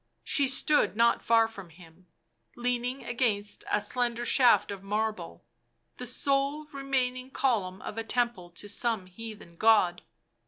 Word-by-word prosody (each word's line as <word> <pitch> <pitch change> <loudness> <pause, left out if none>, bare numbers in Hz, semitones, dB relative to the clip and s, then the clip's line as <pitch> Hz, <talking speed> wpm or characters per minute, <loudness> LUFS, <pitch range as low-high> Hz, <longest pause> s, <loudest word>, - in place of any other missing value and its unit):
She 275 - +2
stood 275 -1 +3
not 235 +1 +3
far 225 -1 +4
from 195 -6 -11
him, 165 +1 -18 0.5
leaning 245 +2 -2
against 225 -4 -1
a 210 - +2
slender 240 +1 -1
shaft 245 -5 +4
of 200 -2 -7
marble, 215 +2 -3 0.5
the - - -6
sole 280 +2 0
remaining 260 -2 -2
column 210 -9 -1
of 225 - -5
a - - -3
temple 230 -6 0
to 180 +4 -9
some 215 -1 -1
heathen 205 -2 -11
god. 205 -5 +4
225 Hz, 135 wpm, -28 LUFS, 200-250 Hz, 0.5 s, far